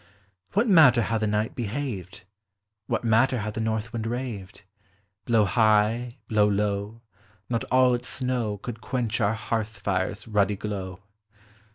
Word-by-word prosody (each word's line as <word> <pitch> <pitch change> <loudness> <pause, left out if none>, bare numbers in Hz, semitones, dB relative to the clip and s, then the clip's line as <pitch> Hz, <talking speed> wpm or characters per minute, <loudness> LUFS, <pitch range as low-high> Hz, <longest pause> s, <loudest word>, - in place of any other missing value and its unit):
What 210 +5 +2
matter 145 - +6
how 115 +1 -1
the 110 - 0
night 105 +2 0
behaved? 110 -5 -5 0.6
What - - -1
matter 115 +3 +3
how 105 0 -3
the 110 - -4
north 110 +1 -2
wind 115 -1 -3
raved? 115 -6 -5 0.6
Blow 115 -3 +3
high, 110 +3 +2
blow 105 -2 +3
low, 105 +2 -1 0.5
not 115 -2 -1
all 130 0 +4
its 120 +1 -3
snow 125 -5 -2
Could 115 +3 -7
quench 125 -4 -2
our 105 +2 +2
hearth 110 -1 -3
fire's 100 +1 -2
ruddy 105 -2 +2
glow. 95 -3 -5
110 Hz, 145 wpm, -26 LUFS, 105-120 Hz, 0.6 s, matter